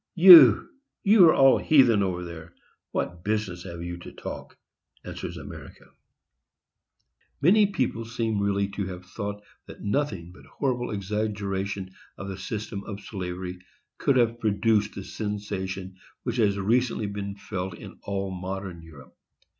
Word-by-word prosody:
"You! 165 - +9 0.4
you 200 -2 +7
are - - +5
all 135 -1 +6
heathen 125 -8 +5
over 90 -2 -1
there,—what 85 +1 -7
business 105 -4 -2
have 85 -2 -7
you 85 0 -5
to - - -10
talk?" - - -8 0.5
answers - - -6
America. - - -11 1.5
Many 200 +8 +5
people 130 - -2
seem 115 -2 -2
really 100 0 +1
to 100 -1 -4
have 90 0 -8
thought 100 +2 -6 0.2
that - - -11
nothing 100 - -2
but 90 - -16
horrible 125 -3 -2
exaggerations 100 -2 -3 0.3
of 100 - -7
the 95 - -6
system 100 +1 -5
of 100 -2 -6
slavery 90 -2 -6 0.4
could 135 - +2
have 120 -1 +2
produced 105 0 +1
the 100 - -6
sensation 95 -3 -5 0.3
which 120 -1 -3
has 100 -4 +2
recently 115 +2 +1
been 100 -1 -5
felt 95 -2 -5
in - - -12
all 100 -1 -3
modern 95 -1 -6
Europe. 75 -5 -15
100 Hz, 140 wpm, -26 LUFS, 95-115 Hz, 1.5 s, You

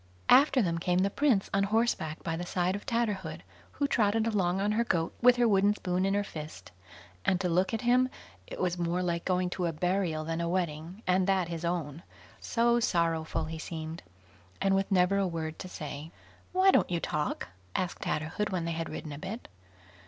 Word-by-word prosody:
After 270 -2 +6
them 170 -2 0
came 180 +1 +1
the 195 +2 +2
prince 255 -8 +2
on 195 - +3
horseback 205 -8 0
by 165 - -2
the 175 - -4
side 180 +1 0
of 205 - -8
Tatterhood, 210 - -1 0.3
who 285 - 0
trotted 220 -3 +2
along 190 -5 +1
on 205 +2 +1
her 225 +2 +2
goat 165 -7 0
with 250 0 +7
her 245 -1 +3
wooden 205 0 +4
spoon 185 -1 0
in 195 - +1
her 205 - +1
fist, 150 - -8 0.5
and 185 - +2
to 190 - 0
look 180 +2 +2
at 225 - -2
him, 250 +1 +3 0.4
it - - -8
was 180 -1 0
more 175 +1 0
like 170 -1 -1
going 185 -1 +1
to 180 -2 -1
a - - 0
burial 170 -1 -1
than 165 +1 -2
a 170 - -1
wedding, 175 +2 -3
and 185 +1 +2
that 190 -3 +2
his 170 -1 -5
own; 170 -3 -2 0.4
so 235 +1 +2
sorrowful 165 -6 0
he 160 0 -6
seemed, 160 0 -6 0.6
and 195 0 +2
with 195 +1 +1
never 185 +1 +4
a 195 - +2
word 160 -2 -4
to 185 - -6
say. 150 -2 -6 0.4
"Why 375 +1 +5
don't - - +3
you 175 -1 0
talk?" 150 - -2 0.3
asked 180 -2 -2
Tatterhood, 160 +7 -2
when 180 -3 -2
they 170 - -1
had 165 0 -3
ridden 150 - -6
a 145 - -7
bit. 195 +7 -6
180 Hz, 205 wpm, -30 LUFS, 165-205 Hz, 0.6 s, with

